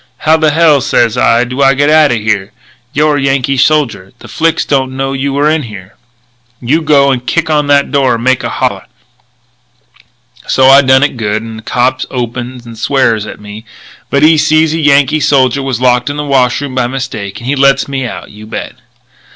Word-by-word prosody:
"'How 155 +1 +4
the 160 -1 +2
hell,' 155 -2 +3
sez 120 -2 +1
I, 115 +1 +2
'do 125 +3 -4
I 135 0 +4
get 145 +2 +1
out 155 -1 +4
of 120 - 0
here?' 105 -1 -2 0.4
'You're 150 +1 +1
a - - -2
Yankee 135 0 0
soldier. 125 -9 0
The - - -14
Flics 165 0 -1
don't 130 -2 -1
know 135 0 -2
you 135 +1 -2
were 140 +2 0
in 155 0 +1
here. 105 -6 -11 0.7
You 140 +7 0
go 140 -3 +3
and 125 -2 -2
kick 160 +5 -1
on 150 -1 +1
that 140 -1 +2
door 135 -4 +1
and 115 - -6
make 130 0 +1
a - - -3
holler.' - - -3 1.6
"So 130 - +2
I 135 +1 +7
done 130 0 +3
it 145 -3 -1
good; 110 -1 -2
and 110 -1 -8
a - - -11
cop 125 +3 -1
opens 120 0 -5
and 115 -2 -11
swears 115 -4 0
at - - -9
me, 105 +1 -10 0.5
but 140 +1 +1
when 155 - +6
he 160 - +2
sees 155 +1 +2
a 165 - -2
Yankee 145 0 +2
soldier 135 -2 +1
was 135 -4 -3
locked 125 +1 +1
in 145 - -5
the 150 - -3
wash 130 -3 +1
room 140 -2 -5
by 125 -2 0
mistake, 125 -6 -6
he 130 +4 -3
lets 140 0 +2
me 135 -1 -4
out, - - -9
you 105 +1 -13
bet." - - -6
135 Hz, 210 wpm, -11 LUFS, 120-145 Hz, 1.6 s, I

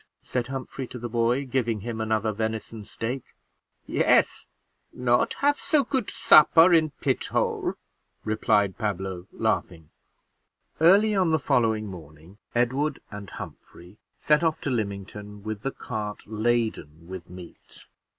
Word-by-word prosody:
said 125 -1 -2
Humphrey 135 0 -5
to 125 - -8
the 120 0 -5
boy, 120 +3 +1
giving 120 -4 -1
him 115 +1 -4
another 110 0 0
venison 110 0 -4
steak. 120 +5 -4 0.6
"Yes; - - +2 0.4
not 120 -1 +1
have 290 +1 +2
so 300 -3 +2
good 260 -3 -1
supper 165 +3 +6
in 160 -2 +4
pithole," 135 -3 0 0.5
replied 105 -2 +1
Pablo, 95 -4 -3
laughing. 90 -8 -2 0.9
Early 200 +7 +5
on 190 -4 +2
the 160 - +3
following 115 -6 +1
morning, 85 0 -12 0.2
Edward 135 +5 +1
and 100 -2 -8
Humphrey 90 +5 -11 0.2
set 150 +2 +2
off 160 -1 +1
to 140 - -2
Lymington 105 -2 -5
with 110 -1 -5
the 135 - -1
cart 105 -5 -6
laden 110 -8 -2
with 95 -2 -8
meat. 90 -1 -13
110 Hz, 130 wpm, -26 LUFS, 105-135 Hz, 0.9 s, supper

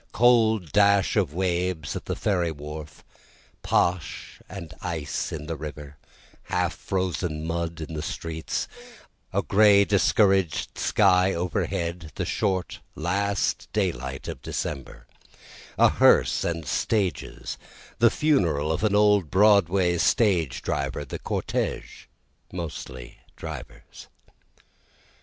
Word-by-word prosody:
Cold 110 -6 +3
dash 100 -2 +4
of 95 -9 +1
waves 90 -2 -1
at - - -6
the - - -2
ferry 90 -5 0
wharf, 75 0 -9 0.6
posh 85 -3 -1
and 85 -4 -8
ice 80 -4 -3
in 75 -1 -5
the 80 +1 -4
river, 75 -1 -8 0.5
half - - 0
frozen 90 -4 -2
mud 85 0 -3
in 80 +1 -6
the 75 - -3
streets, 80 +1 -4 0.6
A - - 0
gray 100 -1 +5
discouraged 95 -4 +2
sky 90 +1 +3
overhead, 85 -1 -2
the - - -2
short 95 -4 -1 0.2
last 100 +5 -1
daylight 65 +2 -2
of - - -6
December, 70 -3 -5 0.7
A - - +6
hearse - - +4
and 85 -2 -2
stages, 95 - -2 0.4
the 115 - +6
funeral 85 - +1
of 80 - -2
an 105 -2 +2
old 105 -5 +4
Broadway 95 -3 +4
stage 90 - +2
driver, 75 - -2
the - - -6
cortege - - -3 0.5
mostly 70 -8 -7 0.2
drivers. - - -9
85 Hz, 110 wpm, -25 LUFS, 80-100 Hz, 0.7 s, A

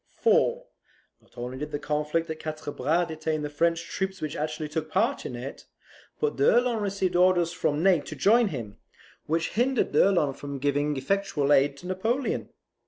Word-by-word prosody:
For, - - +3 0.6
not - - -28
only 125 +2 -5
did 150 +1 -4
the 145 - -3
conflict 150 +3 -1
at 155 0 -6
Quatre 155 -1 -5
Bras 160 +7 +1
detain 155 -1 -3
the 150 - -4
French 165 +2 +1
troops 190 +1 -3
which 155 - -4
actually 155 0 -3
took 155 +1 -4
part 225 - 0
in 125 - -6
it, 125 +3 -8 0.5
but 450 -1 0
d'Erlon 245 - +3
received 195 -3 -1
orders 175 -1 +3
from 150 0 0
Ney 190 -3 +5
to - - -8
join 230 +3 +4
him, 115 - -6 0.5
which 165 +1 0
hindered 245 +4 +1
d'Erlon 175 -8 +3
from 140 +1 -6
giving 145 +1 0
effectual 150 -2 +1
aid 140 0 +3
to 175 - -12
Napoleon. 225 +8 -1
160 Hz, 170 wpm, -27 LUFS, 145-195 Hz, 0.6 s, Ney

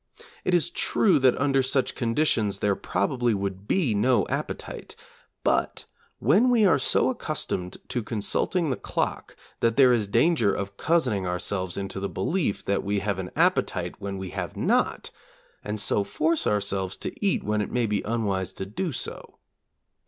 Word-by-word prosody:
It 180 - +2
is 170 - +1
true 195 -8 +3
that 130 -1 +3
under 135 -1 +3
such 130 0 0
conditions 115 -5 +1
there 100 0 +1
probably 115 +6 0
would 100 0 -4
be 160 - +2
no 120 +5 +3
appetite, - - -5 0.5
but - - 0 0.3
when 195 - +4
we 235 -4 +4
are 165 -7 +4
so - - +3
accustomed 90 0 -3
to 125 -1 -1
consulting 120 - -1
the 130 - -1
clock - - -3 0.2
that 115 -1 +1
there 130 -2 +7
is 110 -4 +1
danger 115 0 +3
of 100 0 -4
cozening 110 - +1
ourselves 90 +1 -2
into 100 0 -4
the 100 0 -3
belief 165 - -1
that 100 - 0
we 100 +1 -1
have 100 -1 -1
an 90 -1 -4
appetite - - +1
when 100 -1 -4
we 95 -1 -6
have - - -5
not, - - +1 0.5
and 105 0 -3
so 100 0 +1
force 155 +11 0
ourselves 95 -2 -1
to - - -4
eat 195 - +2
when 105 0 0
it 105 - -3
may 120 -1 +1
be 105 -2 0
unwise 105 -5 -1
to 95 - -5
do 155 - -3
so. 125 - -6
105 Hz, 165 wpm, -26 LUFS, 100-135 Hz, 0.5 s, there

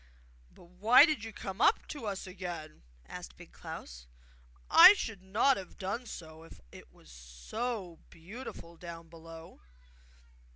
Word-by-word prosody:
'But - - -19
why 205 +10 +6
did 305 -9 -2
you 225 - -7
come 195 0 -7
up - - +3
to 280 -7 -6
us 195 -2 -4
again?' 180 -4 -8 0.3
asked 60 0 -10
Big - - -14
Klaus. - - -10 0.6
'I 400 - +10
should 220 - -5
not 215 +8 +2
have 190 -2 -10
done 205 +6 -4
so, 160 -4 -10
if 165 - -15
it - - -13
is - - -19
so 160 - -6
beautiful 170 -2 -11
down 170 -1 -10
below! 165 - -13
180 Hz, 140 wpm, -31 LUFS, 165-220 Hz, 0.6 s, I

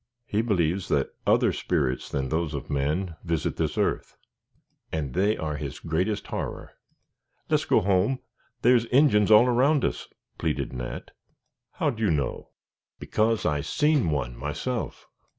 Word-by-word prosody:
He 105 -1 0
believes 95 -5 0
that 70 -2 0 0.2
other - - +4
spirits 70 -8 -1
than 65 -2 -2
those 80 +2 -1
of - - -6
men 80 +5 -1
visit 85 -3 -1
this - - -1
earth, - - -1 0.7
and 75 -5 -3
they 100 +4 +2
are 75 -2 -3
his 70 -3 -5
greatest 90 +6 -1
horror. - - -5 0.8
"Les' - - +2
go - - +3
home; 100 +6 +2 0.5
there's 120 -1 +5
Injins 120 -6 +4
all 110 +2 +8
around 130 +4 +3
us," - - -3 0.3
pleaded - - -2
Nat. 60 -1 -6 0.6
"How'd 145 -10 -1
you 110 -3 +2
know?" 75 -4 -2 0.5
"Because 110 +1 0
I 75 -1 +1
seen 145 - +2
one 70 -5 -2
myself." 75 - -4
90 Hz, 140 wpm, -26 LUFS, 75-115 Hz, 0.8 s, all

